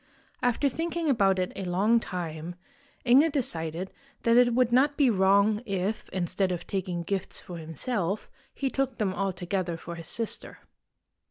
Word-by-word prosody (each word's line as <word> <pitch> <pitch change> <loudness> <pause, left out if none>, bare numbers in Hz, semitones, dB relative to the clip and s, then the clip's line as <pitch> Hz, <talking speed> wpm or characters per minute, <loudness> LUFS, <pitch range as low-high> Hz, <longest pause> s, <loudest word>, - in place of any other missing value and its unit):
After 250 +3 +2
thinking 330 +2 -1
about 195 -6 +3
it 185 -1 -1
a 195 - -4
long 195 +6 +3
time, 170 -4 -5 0.5
Inge 275 +6 +6
decided 175 - -1 0.3
that 230 0 +4
it 240 -1 +5
would 250 -1 +3
not 280 +4 +3
be 270 -5 +4
wrong 200 +2 +3
if, 195 0 -2
instead 185 +1 -1
of 175 - -4
taking 185 -3 -3
gifts 190 +2 -3
for 175 -2 -8
himself, 180 - -2 0.3
he 270 -2 -1
took 270 -2 -1
them 200 -4 0
altogether 185 -2 -2
for 170 +1 -8
his 165 -1 -8
sister. 230 -2 -2
195 Hz, 155 wpm, -28 LUFS, 180-245 Hz, 0.5 s, Inge